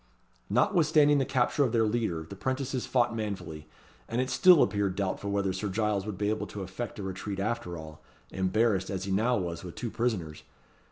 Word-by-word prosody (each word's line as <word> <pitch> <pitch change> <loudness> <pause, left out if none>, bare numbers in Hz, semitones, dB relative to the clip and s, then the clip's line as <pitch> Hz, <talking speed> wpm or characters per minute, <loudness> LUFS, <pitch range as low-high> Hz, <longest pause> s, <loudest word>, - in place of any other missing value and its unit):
Notwithstanding 150 -5 +4
the 135 - +1
capture 135 +1 +2
of 125 -4 0
their 115 -1 +3
leader, 105 -8 -1
the 100 - -8
'prentices 130 +4 -2
fought 120 -3 +2
manfully, 95 -8 -5 0.4
and 115 - -1
it 130 0 0
still 180 -5 +7
appeared 100 -3 0
doubtful 100 0 -2
whether 100 -1 0
Sir 100 +2 -3
Giles 105 0 0
would 105 -3 -4
be 105 +2 0
able 110 - -2
to 100 - -6
effect 95 +6 -6
a 105 - -5
retreat 95 +1 -4
after 105 -4 -2
all, 80 -1 -10 0.3
embarrassed 95 +1 +1
as 95 -1 -3
he 100 - -3
now 115 +5 +2
was 85 -2 -4
with 90 -2 -8
two 115 - -4
prisoners. 95 -11 -2
105 Hz, 190 wpm, -29 LUFS, 95-120 Hz, 0.4 s, still